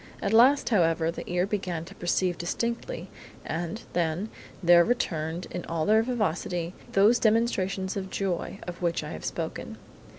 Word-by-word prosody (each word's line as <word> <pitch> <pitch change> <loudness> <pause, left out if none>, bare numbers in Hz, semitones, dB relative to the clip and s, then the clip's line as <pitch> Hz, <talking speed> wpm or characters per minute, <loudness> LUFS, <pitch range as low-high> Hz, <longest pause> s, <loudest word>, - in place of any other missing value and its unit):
At - - -1
last, 260 +5 +6
however, 165 -6 +2
the - - -8
ear 180 +1 +2
began 185 -5 -3
to - - -11
perceive 175 0 0
distinctly, 235 - -3 0.4
and, 170 +7 -4
then, 175 +4 0 0.3
there 170 0 +7
returned 170 -7 -1
in 180 - -4
all 165 -2 -1
their 220 +1 +5
vivacity, 180 -7 -1 0.2
those 210 +5 +5
demonstrations 200 -4 +1
of 190 -1 -4
joy 190 -1 -2
of 175 0 -7
which 170 -1 0
I - - -6
have - - -7
spoken. - - -4
185 Hz, 155 wpm, -27 LUFS, 170-220 Hz, 0.4 s, there